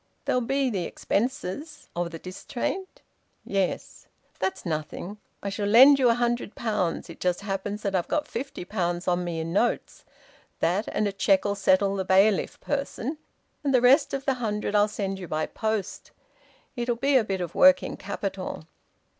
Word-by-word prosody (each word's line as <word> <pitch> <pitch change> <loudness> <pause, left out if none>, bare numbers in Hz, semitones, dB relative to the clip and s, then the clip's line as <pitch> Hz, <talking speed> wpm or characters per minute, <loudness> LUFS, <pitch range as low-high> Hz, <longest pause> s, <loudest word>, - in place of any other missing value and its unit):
"There'll 250 - +1
be 270 +2 0
the 185 -5 -2
expenses." 260 - -3
"Of 175 0 -1
the 165 - -7
distraint?" 240 - -5 0.4
"Yes." 195 -2 -2 0.3
"That's 190 +1 -2
nothing. 165 +5 -4 0.2
I 200 - -2
shall 200 +1 -2
lend 265 +6 +8
you 250 -2 +5
a 230 - +4
hundred 240 -2 -1
pounds. 210 -7 -1
It - - -11
just 180 0 0
happens 200 +1 -4
that 200 -2 -1
I've 180 -2 0
got 305 - -1
fifty 270 -4 -5
pounds 175 -3 -2
on 180 0 +1
me 170 -2 -3
in 165 +1 -3
notes. 235 +5 0 0.6
That 190 +6 +1
and 210 - 0
a - - -1
cheque'll 195 +1 +2
settle 195 0 +2
the 190 - -1
bailiff 195 +2 +3
person, 285 0 -3 0.4
and 275 -2 +2
the - - +6
rest 270 +4 +5
of 270 0 -5
the 270 - +2
hundred 210 -2 -2
I'll 205 0 +4
send 195 -2 -3
you 180 - -7
by 155 0 -1
post. 220 -3 -3 0.7
It'll 240 -1 -1
be 275 +4 +1
a 255 - +6
bit 195 -3 -2
of 175 -2 -4
working 275 0 +5
capital." - - -5
205 Hz, 170 wpm, -26 LUFS, 185-245 Hz, 0.7 s, lend